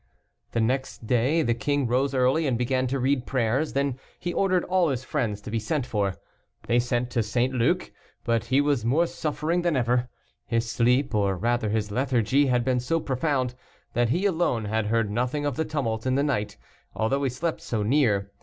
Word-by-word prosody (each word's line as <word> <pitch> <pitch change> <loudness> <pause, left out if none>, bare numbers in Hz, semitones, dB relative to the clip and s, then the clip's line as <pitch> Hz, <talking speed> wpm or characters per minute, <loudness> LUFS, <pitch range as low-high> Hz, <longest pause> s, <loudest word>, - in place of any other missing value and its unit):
The 115 - +1
next 130 0 -1
day 130 +8 +2
the 120 - +2
king 145 +3 0
rose 130 +3 +1
early, 130 +5 +2
and 125 -3 +1
began 130 +1 0
to 135 +2 -1
read 130 0 0
prayers 130 +4 0
then 140 -2 -1 0.2
he 175 0 -4
ordered 185 -2 +2
all 180 -2 +2
his 130 -2 -2
friends 115 -8 -2
to 105 - -8
be 115 - 0
sent 135 +5 -1
for. 100 -6 -1 0.5
They 120 - +2
sent 120 0 -1
to 120 - +1
St. 120 +4 0
Luc, 120 -2 +1 0.3
but 115 -1 0
he 130 +4 +3
was 145 -5 +1
more 140 +9 +3
suffering 160 +2 -1
than 170 -3 +1
ever. 125 0 +1 0.4
His 115 0 0
sleep, 125 +3 +2
or 100 -3 +1
rather 120 +2 0
his 105 -1 -1
lethargy, 130 +2 +2
had 125 -2 +1
been 130 -1 +2
so 145 +7 0
profound, 130 -3 -1 0.4
that 120 -1 +2
he 175 - +1
alone 165 - +1
had 110 0 -1
heard 115 -1 +1
nothing 125 +6 -1
of 145 - -1
the 160 - -1
tumult 125 -7 -2
in 130 - +2
the 140 - +2
night, 120 -8 -1 0.4
although 125 +6 0
he 135 - +1
slept 160 +7 -3
so 110 -3 -2
near. 105 -5 +2
125 Hz, 200 wpm, -26 LUFS, 115-140 Hz, 0.5 s, he